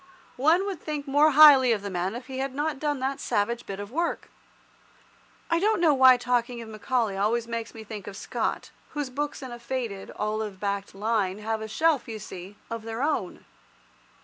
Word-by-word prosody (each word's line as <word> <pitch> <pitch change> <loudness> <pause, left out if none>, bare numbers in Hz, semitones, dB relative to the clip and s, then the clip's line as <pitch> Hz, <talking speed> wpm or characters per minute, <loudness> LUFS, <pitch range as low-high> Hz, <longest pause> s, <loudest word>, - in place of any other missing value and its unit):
One 335 +7 +4
would 385 -6 -4
think 300 -2 -4
more 290 +3 +5
highly 280 -4 +8
of 210 -3 0
the 200 - -4
man 185 +3 -2
if 245 +1 -7
he 265 -1 -6
had 270 0 -3
not 295 -1 -1
done 295 -2 -1
that 270 +1 -1
savage 235 +2 -1
bit 195 0 -5
of 205 +1 -7
work. 335 +5 -2 1.2
I 335 0 +2
don't 425 +2 +2
know 325 -3 +5
why 260 -2 +7
talking 245 0 -1
of 230 -1 -8
Macaulay 220 -1 -1
always 225 +4 0
makes 230 -1 -5
me 220 - -8
think 210 -2 -8
of 200 - -7
Scott, - - -3 0.2
whose 290 -3 -3
books 290 +1 -3
in 260 - -7
a 240 - -8
faded, 235 -5 -4
olive 210 -2 -3
backed 200 -1 -3
line, 205 -2 0
have 220 +1 -3
a 220 - -4
shelf, 310 +4 +1
you 225 -1 -5
see, 190 -1 -9
of 230 0 -5
their 225 +3 -4
own. 310 - -2
240 Hz, 200 wpm, -26 LUFS, 215-285 Hz, 1.2 s, highly